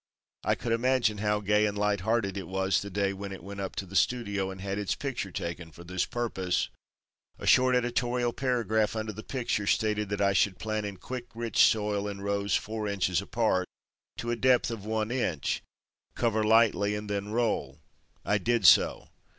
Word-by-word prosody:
I - - +2
could 120 - -4
imagine 115 -2 +2
how 105 0 +1
gay 105 +1 +3
and 105 0 -3
light 105 0 +1
hearted 100 0 0
it 95 -4 -5
was 95 +1 +1
the 100 - -6
day 100 0 0
when 100 0 -6
it 95 - -8
went 100 0 -8
up 95 -1 -4
to 95 - -3
the 95 +1 -11
studio 100 -5 +1
and 95 0 -8
had 100 +1 -3
its 100 - -1
picture 130 -8 -4
taken 85 -1 -5
for 85 - -12
this 90 +1 -1
purpose. 95 -7 -1 0.7
A - - -8
short 130 0 +5
editorial 120 0 0
paragraph 115 -5 0
under 110 0 -3
the 110 - -7
picture 120 -5 -2
stated 105 -1 +1
that 100 - -2
I 100 -1 +3
should 95 -1 +2
plant 110 0 -2
in 100 -2 -7
quick, 125 +5 -6
rich 115 -2 -2
soil, 105 -2 +2
in 100 -1 -5
rows 100 -1 0
four 110 0 -2
inches 95 -3 0
apart, 100 -4 0 0.5
to 120 - -3
a - - +1
depth 125 0 +3
of 110 -3 -6
one 110 0 -1
inch, 90 - -1 0.5
cover 110 -2 +1
lightly 105 -2 +4
and 105 0 -5
then 100 0 -2
roll. 105 - -1 0.5
I 105 0 +2
did 115 +1 +1
so. - - +5
105 Hz, 190 wpm, -29 LUFS, 100-115 Hz, 0.7 s, short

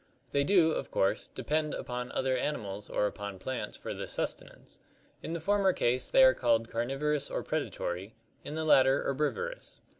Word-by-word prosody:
They 140 - +2
do, 165 0 +4
of - - -3
course, 95 - 0
depend 155 0 -1
upon 125 0 -5
other 130 -1 +1
animals 105 -7 -3
or - - +1
upon 100 -1 -4
plants 130 +7 -4
for - - -5
their - - -5
sustenance; - - -5 0.4
in 165 - -5
the 170 - -2
former 195 +2 +2
case 125 -3 +1
they 265 - +6
are 260 - +8
called 115 -2 +1
carnivorous 135 +5 -1
or - - -3
predatory, 90 +5 -3 0.3
in 150 - -6
the 160 0 -1
latter 135 -2 +5
herbivorous. 310 - -3
135 Hz, 170 wpm, -30 LUFS, 115-155 Hz, 0.4 s, are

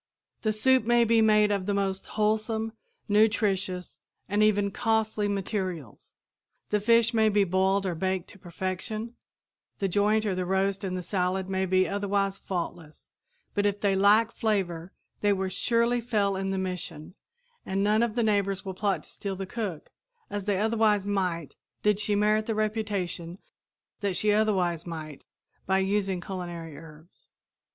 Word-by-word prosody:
The 215 - +1
soup 255 +4 +3
may 240 +1 +4
be 230 0 +4
made 210 -1 +4
of 200 -2 -1
the 205 - +1
most 195 -1 -1
wholesome, 220 +1 0 0.3
nutritious 205 -4 +1 0.3
and 205 +1 +1
even 205 -1 +3
costly 220 -1 0
materials; 190 - -4 0.6
the 210 - +3
fish 230 +2 +4
may 220 -1 +4
be 205 -1 +3
boiled 190 +1 +1
or 185 - 0
baked 185 +1 -2
to 205 - -14
perfection; 190 +6 -4 0.6
the 195 - 0
joint 210 +3 +2
or 200 - 0
the 185 0 -1
roast 195 +1 0
and 185 -1 -2
the 180 - -4
salad 185 +1 -1
may 190 0 0
be 185 0 +3
otherwise 200 -1 -1
faultless, 170 -4 -6 0.4
but 205 0 +2
if 205 0 -1
they 200 -2 +2
lack 210 +4 +4
flavor 190 -7 -1 0.3
they 205 -1 +3
will 190 -1 -1
surely 235 +4 +1
fail 210 -4 0
in 195 0 -2
their 195 - -1
mission, 180 -4 -5 0.5
and 195 +1 -1
none 210 +2 +3
of 235 -2 0
the 240 - +2
neighbors 200 -3 +1
will 190 - -4
plot 200 +1 -1
to - - -13
steal 200 -1 -4
the 195 +1 -5
cook, 190 -6 -5 0.4
as 205 -2 -3
they 205 -2 +1
otherwise 215 -1 +2
might 180 -6 -2 0.3
did 210 -1 +3
she 210 -1 0
merit 215 +1 +2
the 225 - -1
reputation 205 -5 -2 0.6
that 200 -3 -1
she 210 +4 +2
otherwise 185 -6 +1
might, 155 -3 -7 0.4
by 190 +1 +3
using 190 -1 0
culinary 175 -4 -6
herbs. 160 +2 -15
200 Hz, 160 wpm, -27 LUFS, 185-215 Hz, 0.6 s, may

